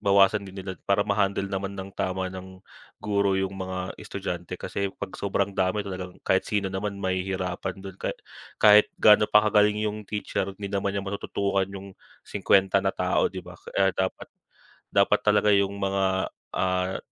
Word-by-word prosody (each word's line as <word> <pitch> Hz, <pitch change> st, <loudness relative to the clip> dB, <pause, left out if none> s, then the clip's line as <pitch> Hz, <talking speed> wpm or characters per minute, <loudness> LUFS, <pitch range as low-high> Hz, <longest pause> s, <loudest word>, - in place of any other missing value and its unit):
bawasan 100 Hz, 0 st, +4 dB
din 95 Hz, -, -11 dB
nila 95 Hz, -3 st, -6 dB
para 100 Hz, +1 st, +3 dB
ma-handle 100 Hz, -1 st, 0 dB
naman 100 Hz, 0 st, -3 dB
nang 95 Hz, 0 st, -7 dB
tama 95 Hz, 0 st, -2 dB
ng 95 Hz, 0 st, -10 dB, 0.4 s
guro 100 Hz, -2 st, +1 dB
yung 95 Hz, 0 st, 0 dB
mga 95 Hz, 0 st, -4 dB
estudyante. 95 Hz, -4 st, -5 dB
Kasi 100 Hz, -1 st, -3 dB
'pag -, -, -7 dB
sobrang 100 Hz, 0 st, 0 dB
dami 95 Hz, +2 st, +1 dB
talagang 90 Hz, -2 st, -7 dB
kahit -, -, +1 dB
sino 100 Hz, -2 st, -1 dB
naman 100 Hz, +1 st, -3 dB
mahihirapan 95 Hz, 0 st, -2 dB
do'n. 95 Hz, -1 st, -9 dB
Ka -, -, -3 dB, 0.5 s
kahit 105 Hz, 0 st, +8 dB
gaano 105 Hz, 0 st, +7 dB
pa 105 Hz, -, +7 dB
kagaling 105 Hz, 0 st, +4 dB
'yong 105 Hz, -1 st, -3 dB
teacher 100 Hz, -1 st, -2 dB
hindi 100 Hz, -1 st, -6 dB
naman 100 Hz, 0 st, -1 dB
niya 100 Hz, -, -1 dB
matutukan 100 Hz, -1 st, -1 dB
'yong 100 Hz, 0 st, -9 dB, 0.3 s
50 95 Hz, 0 st, +3 dB
na 95 Hz, -, +2 dB
tao, -, -, +2 dB
'di -, -, -7 dB
ba? -, -, -11 dB
Kaya 95 Hz, 0 st, +1 dB
dapat 95 Hz, 0 st, -2 dB, 0.6 s
dapat -, -, +3 dB
talaga 105 Hz, 0 st, +4 dB
'yong 100 Hz, 0 st, +2 dB
mga, 95 Hz, 0 st, 0 dB, 0.5 s
ah, 95 Hz, 0 st, 0 dB
100 Hz, 165 wpm, -26 LUFS, 95-100 Hz, 0.6 s, kahit